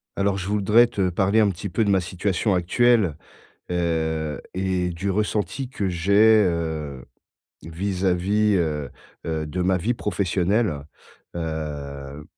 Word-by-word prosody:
Alors, 100 0 0
je 95 -1 -5
voudrais 105 +3 +4
te 100 -5 -1
parler 95 +5 +2
un 105 -2 +4
petit 95 +1 -5
peu 110 - +1
de 105 - 0
ma 95 -1 +4
situation 95 +3 -1
actuelle, 95 0 +2 0.5
heu 80 -3 -1
et 95 -1 0
du 95 +3 -2
ressenti 105 +6 -1
que 105 -6 -2
j'ai, 90 +2 0 0.3
heu, 80 -7 -3 0.6
vis-à-vis, 95 +4 0
heu, 75 -5 -1 0.4
heu, 80 -1 -2
de 90 +5 -4
ma 95 +1 +2
vie 100 +7 0
professionnelle. 100 -4 0 0.6
Heu, 75 -3 -5
90 Hz, 130 wpm, -23 LUFS, 80-100 Hz, 0.6 s, voudrais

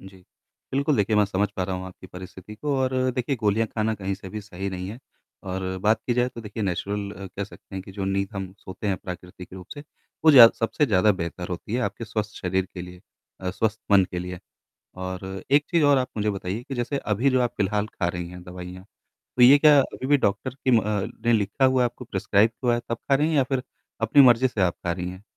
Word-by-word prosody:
जी, 95 0 -13 0.6
बिल्कुल, 140 +1 +1
देखिए 105 +1 +2
मैं 105 - +5
समझ 100 +1 0
पा 95 - 0
रहा 95 0 -3
हूँ 90 0 -6
आपकी 95 0 -12
परिस्थिति 95 +2 -10
को 140 +5 -2
और 130 0 0 0.2
देखिए 125 +2 -1
गोलियाँ 110 0 +1
खाना 110 0 0
कहीं 95 -1 -3
से 95 0 -10
भी 105 +3 -6
सही 100 -1 -6
नहीं 90 0 -5
है 110 +4 -7 0.4
और 95 0 -4
बात 110 +2 +3
की 120 - +1
जाए 125 +1 +2
तो 120 -2 -9
देखिए 110 0 -6
नेचुरल 100 +1 -3
कह 100 - -2
सकते 100 - -14
हैं 95 - -4
कि 95 - -12
जो 95 0 -4
नींद 95 0 0
हम 95 -1 -5
सोते 95 +2 -8
हैं 100 -2 +1
प्राकृतिक 90 -1 -9
रूप 90 -1 -9
से, 145 - -8 0.4
वो 160 - +9
ज़्या 130 -6 +11
सबसे 130 +6 +1
ज़्यादा 105 -1 +4
बेहतर 90 -1 -5
होती 90 +4 -5
है 125 - +1
आपके 115 - -3
स्वस्थ 110 -1 -4
शरीर 95 +1 -1
के 90 - -5
लिए 90 0 -11 0.4
अ, 95 -1 -2
स्वस्थ 110 +3 -1
मन 100 -2 +6
के 90 - -3
लिए 90 0 -5 0.6
और 95 +1 -6
एक 145 +1 +5
चीज़ 170 -3 +3
और 145 -1 +5
आप 125 - -1
मुझे 105 0 +1
बताइए 100 +2 -4
कि 135 - -6
जैसे 125 +3 -2
अभी 115 +4 +1
जो 130 -1 +2
आप 120 - -1
फिलहाल 105 +1 0
खा 90 -5 -2
रही 85 0 -4
हैं 90 0 -10
दवाइयाँ 90 +1 -9 0.5
तो - - +3
ये 135 +4 +9
क्या 150 -1 +7
अभी 130 0 -5
भी 145 +1 +5
डॉक्टर 100 -3 -1
की 130 -1 -1
म 115 -2 +5
अ, 105 -2 -1 0.2
ने 120 - +4
लिखा 105 +5 +2
हुआ 130 -1 +3
है - - +3
आपको 120 +1 -5
प्रिस्क्राइब 100 +2 +2
हुआ 120 -1 +3
है 120 - -3
तब 115 - -1
खा 135 - +1
रही 150 +3 +2
हैं 160 - 0
या 135 - +5
फिर 130 -1 -2 0.4
अपनी 115 +6 +6
मर्जी 125 0 +6
से 110 -5 -2
आप 90 -2 +2
खा 85 - +1
रही 90 0 -4
हैं? 95 +2 -12
105 Hz, 245 wpm, -25 LUFS, 95-120 Hz, 0.6 s, ज़्या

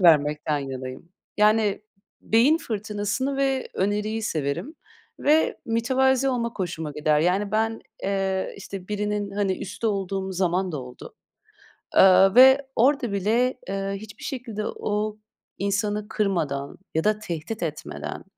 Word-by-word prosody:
vermekten 150 -3 +4
yanayım. 130 +2 -6 0.3
Yani, 210 -1 +3 0.4
beyin 255 +9 +4
fırtınasını 215 +2 -2
ve 270 -1 0
öneriyi 210 +3 -1
severim 155 - -2 0.5
ve 310 +2 +3
mütevazı 265 +3 +2
olmak 235 -2 -2
hoşuma 160 -5 -3
gider. 150 0 +2
Yani, 190 +5 +1
ben, 225 +1 0 0.2
eee, 195 -1 -1
işte, 195 -2 -8
birinin, 210 -1 -2
hani, 195 -2 0
üstü 225 +4 -4
olduğum 195 -1 -2
zaman 180 0 0
da 150 - -3
oldu. 125 0 -11 0.8
Aaa, 190 0 +6
ve 265 +2 +8
orada 255 -2 +3
bile, 230 +6 +1
eee, 195 0 -2
hiçbir 205 +1 -10
şekilde 235 -6 -4
o 210 0 -2 0.4
insanı 205 +1 -1
kırmadan 155 -9 -1 0.2
ya 160 - +1
da 215 0 +2
tehdit 180 +1 -5
etmeden, 155 -2 -5
205 Hz, 125 wpm, -25 LUFS, 180-225 Hz, 0.8 s, ve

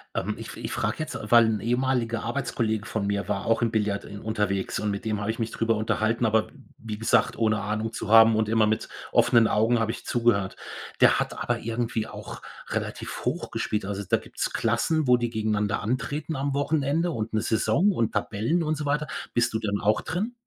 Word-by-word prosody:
Ähm, - - -1
ich - - -8
fr - - -9
ich - - -5
frage - - -1
jetzt, - - -4
äh, - - -7
weil 120 -1 +8
'n 110 -1 0
ehemaliger 120 0 0
Arbeitskollege 115 -4 -1
von 110 -3 -2
mir 100 0 -1
war 100 -1 -2
auch 115 - +2
im 115 -1 +1
Billard 105 -3 -1
en 100 - -8
unterwegs 105 -3 -1
und 105 - -1
mit 100 +2 -5
dem 110 -2 -1
habe 100 +2 -1
ich 115 - -8
mich 115 0 -2
drüber 115 0 +1
unterhalten. 110 +2 0
Aber 110 0 +2
w - - -19 0.3
wie 110 -2 -6
gesagt, 110 - +2
ohne 110 -2 +2
Ahnung 110 +2 -2
zu 115 - -5
haben 115 0 +8
und 110 -1 +1
immer 110 0 +3
mit 110 0 0 0.2
offenen 115 -1 +5
Augen 115 +3 +3
habe 110 -1 0
ich 115 - -9
zugehört. 115 -5 +1 0.5
Der - - +6
hat - - -3
aber - - -1
irgendwie 115 -1 -2
auch - - -9 0.3
relativ - - -4
hoch - - -2
gespielt. 105 - -2
Also, 100 +1 -4
da - - +5
gibt's - - -4
Klassen, 130 +7 +1
wo 125 -1 +5
die 120 -1 -1
gegeneinander 105 -2 -1
antreten 130 +7 -2
am 140 +1 -1
Wochenende 150 +4 +1
und 110 -5 -4
'ne 110 - +1
Saison 170 - +2
und 115 - -1
Tabellen 115 +12 0
und 155 0 0
so 150 - -4
weiter. 150 +1 0 0.3
Bist 120 -1 +1
du 110 - 0
denn 100 -2 -1
auch 105 +1 +2
drin? 205 +8 -3
115 Hz, 215 wpm, -26 LUFS, 105-120 Hz, 0.5 s, weil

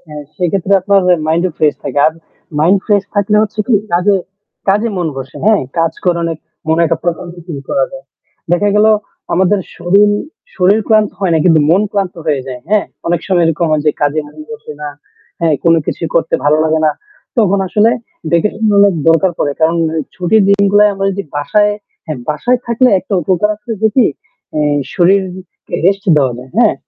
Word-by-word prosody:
হ্যাঁ 150 -1 -8
সেক্ষেত্রে 185 +2 -1
আপনার 200 +1 +2 0.3
মাইন্ড 165 +2 +1
ফ্রেশ 150 -1 +2
থাকে। - - -3
আর 155 - +2 0.5
মাইন্ড 180 +6 +4
ফ্রেশ 205 -2 +2
থাকলে 205 +1 +1
হচ্ছে 215 0 -4
কি 245 - +2 0.2
কাজে 190 +4 +3 0.5
কাজে 210 +4 +2
মন 175 - -1
বসে, 135 0 -8
হ্যাঁ? 215 -1 +4 0.2
কাজ 165 0 +1
করে 175 -1 +2
অনেক 165 -2 -3 0.3
মনে 160 +1 +2
একটা 165 -1 -1
প্রনন্দিত 175 0 -4
ফিল 145 -5 -6
করা 280 - +2
যায়। - - -10 0.5
দেখা 205 +4 +2
গেল 210 +1 +4 0.5
আমাদের 190 +3 +2 0.2
শরীর 200 +4 +3 0.4
শরীর 195 +3 +3
ক্লান্ত 215 -2 +3
হয় 190 -3 +1
না - - +3
কিন্তু 165 -3 +5
মন 185 +5 +4
ক্লান্ত 195 -3 -2
হয়ে 145 -3 +1
যায়। 125 -2 -7
হ্যাঁ? 210 0 +2 0.2
অনেক 170 -1 0
সময় 180 -3 +2
এরকম 165 +1 0
হয় 155 -1 +1
যে - - +6
কাজে 145 +1 +1
মন 150 +1 -18
বসে 225 -8 -8
না। 150 - -4 0.5
হ্যাঁ। 165 -2 +2
কোন 165 0 +5
কিছু - - -4
করতে - - +1
ভালো 150 - +4
লাগে 160 0 +1
না। 155 - +4 0.5
তখন 200 -3 +3
আসলে 210 +5 +3 0.4
দেখুন 210 +6 0
অনেক 200 -2 +5
দরকার 165 +3 +4
পড়ে। 145 - 0
কারণ 160 +1 +2 0.4
ছুটির 195 +4 +2
দিনগুলা 200 +1 +4
আমরা 195 0 -2
যদি 200 +1 -4
বাসায় 205 +8 +2 0.3
হ্যাঁ 155 -4 -5
বাসায় 240 - 0
থাকলে 235 +2 +3
একটা 190 +3 -9
উপকার 185 +5 +1
আছে 210 +3 -13
যে 220 - +5
কি 255 - +5 0.5
আ - - +1 0.3
শরীরকে 185 0 -1
রেস্ট 195 +1 +1
দেওয়া 135 -3 +1
যায়। 130 +1 -14
হ্যাঁ? 235 -3 +4
185 Hz, 185 wpm, -14 LUFS, 165-205 Hz, 0.5 s, যে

